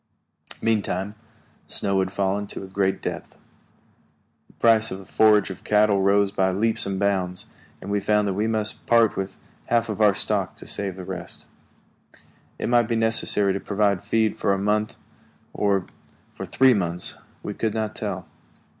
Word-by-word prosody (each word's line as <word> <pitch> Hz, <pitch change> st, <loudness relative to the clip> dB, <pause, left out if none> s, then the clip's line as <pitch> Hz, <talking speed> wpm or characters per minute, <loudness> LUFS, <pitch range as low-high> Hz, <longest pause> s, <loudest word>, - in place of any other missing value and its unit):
Meantime, 105 Hz, -3 st, 0 dB, 0.5 s
snow 100 Hz, -1 st, 0 dB
had 95 Hz, 0 st, -1 dB
fallen 100 Hz, +1 st, -1 dB
to -, -, -6 dB
a -, -, -8 dB
great 95 Hz, 0 st, -1 dB
depth. -, -, -6 dB, 1.1 s
The -, -, -24 dB
price 115 Hz, -1 st, +3 dB
of 95 Hz, 0 st, -8 dB
forage 105 Hz, -2 st, +4 dB
for 95 Hz, -, -5 dB
cattle 105 Hz, -1 st, +3 dB
rose 100 Hz, +1 st, +3 dB
by 95 Hz, -1 st, +1 dB
leaps 110 Hz, +3 st, 0 dB
and 95 Hz, -1 st, -2 dB
bounds, 95 Hz, -3 st, -1 dB, 0.3 s
and 100 Hz, -, -7 dB
we 100 Hz, -, +1 dB
found 105 Hz, +1 st, +1 dB
that 100 Hz, -, 0 dB
we 105 Hz, +3 st, 0 dB
must 110 Hz, -1 st, -1 dB
part 115 Hz, -2 st, +4 dB
with 95 Hz, 0 st, -4 dB, 0.3 s
half 115 Hz, -1 st, +1 dB
of 110 Hz, 0 st, -3 dB
our 105 Hz, -2 st, +5 dB
stock -, -, 0 dB
to -, -, -11 dB
save 100 Hz, -3 st, -3 dB
the 95 Hz, -1 st, -8 dB
rest. 90 Hz, -2 st, -8 dB, 1.1 s
It -, -, -3 dB
might 120 Hz, -2 st, +3 dB
be 115 Hz, -, 0 dB
necessary 110 Hz, -3 st, +2 dB
to 100 Hz, -, -2 dB
provide 100 Hz, -2 st, 0 dB
feed 110 Hz, -1 st, 0 dB
for 100 Hz, -, +2 dB
a -, -, -3 dB
month, 105 Hz, +2 st, 0 dB, 0.6 s
or 100 Hz, -3 st, +1 dB, 0.5 s
for -, -, -6 dB
three 130 Hz, -1 st, +4 dB
months; 90 Hz, -4 st, +1 dB, 0.3 s
we 105 Hz, -, -4 dB
could 110 Hz, +1 st, -2 dB
not 110 Hz, -1 st, -2 dB
tell. -, -, -4 dB
100 Hz, 170 wpm, -24 LUFS, 95-110 Hz, 1.1 s, our